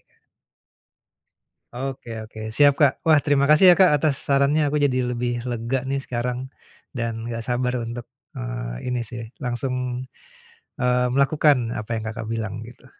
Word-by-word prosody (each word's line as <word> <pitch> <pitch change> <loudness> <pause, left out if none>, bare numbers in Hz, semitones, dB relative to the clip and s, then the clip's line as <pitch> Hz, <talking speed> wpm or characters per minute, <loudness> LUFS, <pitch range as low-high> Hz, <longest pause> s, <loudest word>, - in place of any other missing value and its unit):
Kak. - - -37 1.6
Oke 130 0 -6
oke, 110 0 -11
siap 145 +2 +5
Kak. 145 -3 +5
Wah, 155 - +6
terima 140 -2 +3
kasih 165 +5 +8
ya - - +6
Kak 175 -6 +6
atas 145 0 +1
sarannya, 140 +2 +3
aku 150 - -1
jadi 130 -2 +1
lebih 120 0 -2
lega 120 +2 -1
nih 135 0 -2
sekarang 125 +2 -3 0.4
dan 115 -3 -3
gak 115 - -3
sabar 125 0 0
untuk, 120 +1 -5 0.3
eee, - - -5
ini 125 - -1
sih 120 -1 -7 0.2
langsung, 125 0 -3 0.7
eee, 125 -1 +2
melakukan 140 -4 +3
apa 110 +1 -6
yang 110 - -6
Kakak 110 0 -5
bilang 110 -3 -3
gitu. 120 +3 -13
125 Hz, 150 wpm, -23 LUFS, 115-140 Hz, 1.6 s, kasih